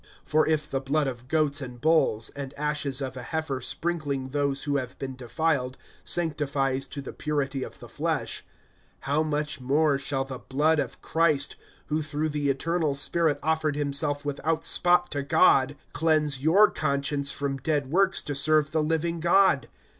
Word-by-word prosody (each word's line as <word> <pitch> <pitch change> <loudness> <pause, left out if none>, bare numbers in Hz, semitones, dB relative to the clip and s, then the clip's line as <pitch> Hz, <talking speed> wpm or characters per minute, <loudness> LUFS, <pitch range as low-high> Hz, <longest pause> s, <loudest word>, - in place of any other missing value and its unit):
(13)For 155 +1 +3
if 155 -1 +1
the 135 - -1
blood 145 +3 0
of 125 -2 -5
goats 150 -1 +1
and 125 -2 -8
bulls, 155 -7 +2
and 140 -1 -8
ashes 145 -2 -1
of 130 -1 -5
a 130 - -6
heifer 140 -1 -3
sprinkling 145 -3 -2
those 140 0 -1
who 145 -1 0
have 130 -2 -5
been 135 -1 -5
defiled, 130 0 -1 0.3
sanctifies 140 -5 0
to 140 - -6
the - - -8
purity 145 -3 -2
of - - -7
the - - -12
flesh; - - -2 0.6
(14)how 145 +3 +1
much 150 -2 -2
more 140 +2 +2
shall 135 -1 -1
the 130 -2 -7
blood 150 +4 +1
of - - -4
Christ, 155 -4 +1 0.3
who 155 +1 -1
through 155 +1 -2
the 145 -1 -1
eternal 155 +2 0
Spirit 155 +2 +2
offered 160 -2 0
himself 145 0 -1
without 150 +3 -1
spot 175 0 +4
to 145 - -1
God, 140 -1 +4 0.2
cleanse 150 -4 +1
your 190 +8 +5
conscience 140 -1 -1
from 140 -1 -2
dead 140 0 -1
works 195 +2 +3
to 145 - -3
serve 150 +2 +2
the 155 - +1
living 165 +2 -1
God? 170 -7 +3
145 Hz, 170 wpm, -26 LUFS, 135-155 Hz, 0.6 s, your